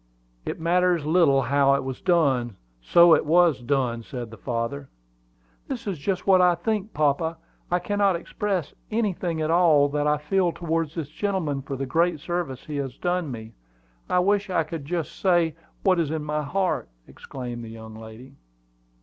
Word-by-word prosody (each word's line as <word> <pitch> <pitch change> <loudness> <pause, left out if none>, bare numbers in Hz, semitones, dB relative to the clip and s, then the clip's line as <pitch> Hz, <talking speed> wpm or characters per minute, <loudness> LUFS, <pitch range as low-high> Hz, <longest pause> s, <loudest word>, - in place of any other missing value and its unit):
"It - - -3
matters 175 -1 +2
little 155 -4 +4
how 140 +2 +3
it 140 - -2
was 130 -1 -6
done, 135 - +2 0.3
so 170 - +6
it - - +4
was 165 -3 +3
done," 120 -2 0
said 120 -1 -7
the - - -9
father. 125 +4 -4 0.8
"That 260 -4 -5
is 195 -7 -3
just 185 +4 -2
what 190 -2 +5
I 180 -1 +5
think, 210 +4 -2
papa. 155 +2 0 0.3
I 175 - +2
can't 205 +3 -2 0.2
express 185 -1 -3 0.2
anything 185 -7 -1
at 155 - 0
all 160 -5 +5
that 145 +1 0
I 150 0 +3
feel 170 +4 0
towards 165 -2 -2
this 160 -4 -4
gentleman 160 -5 -2
for 135 0 -5
the 135 +1 -3
great 165 +4 +1
service 170 -5 -4
he 150 -1 -5
has 135 -2 -4
done 175 -3 -1
me. 110 -2 -8 0.6
I - - +2
wish 200 +2 +2
I 175 -3 +1
could 155 -2 -7 0.2
say 175 -3 +1
just 165 +1 -28 0.2
what 185 -3 +3
is 160 -4 0
in 155 -1 -3
my 150 0 -2
heart!" 175 - -1 0.2
exclaimed 120 -3 -7
the - - -8
fair 115 - -10
young 110 0 -10
lady. 110 +5 -12
160 Hz, 180 wpm, -25 LUFS, 135-180 Hz, 0.8 s, so